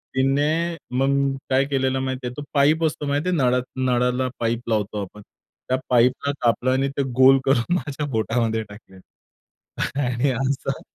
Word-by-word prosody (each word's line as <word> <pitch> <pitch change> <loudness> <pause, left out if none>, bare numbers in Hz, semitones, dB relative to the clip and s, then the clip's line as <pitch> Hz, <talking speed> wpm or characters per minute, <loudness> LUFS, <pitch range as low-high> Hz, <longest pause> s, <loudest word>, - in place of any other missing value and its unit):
तिने 150 +6 +1 0.2
मग 140 0 +1
काय 130 +1 +3
केलेलं 135 -1 0
माहिती 130 -1 -3
आहे? 125 - -6
तो 145 - -5
पाईप 150 +3 +3
असतो 150 -1 -2
माहिती 145 +5 0
आहे 175 - +1
नळा 125 -2 +3 0.3
नळाला 125 +1 +1
पाईप 115 +1 -2
लावतो 105 -1 -1
आपण, 105 +2 -11 0.5
त्या 130 - +2
पाईपला 125 +3 +3
कापलं 120 +2 +2
आणि 135 +1 +1
ते 140 - +2 0.2
गोल 135 +1 +8
करून 135 +5 +2
माझ्या 150 -4 -3
बोटामध्ये 115 -2 0
टाकलं. 100 -2 -14 1.1
आणि 125 +3 0
असं 135 +1 -2
130 Hz, 155 wpm, -23 LUFS, 120-140 Hz, 1.1 s, गोल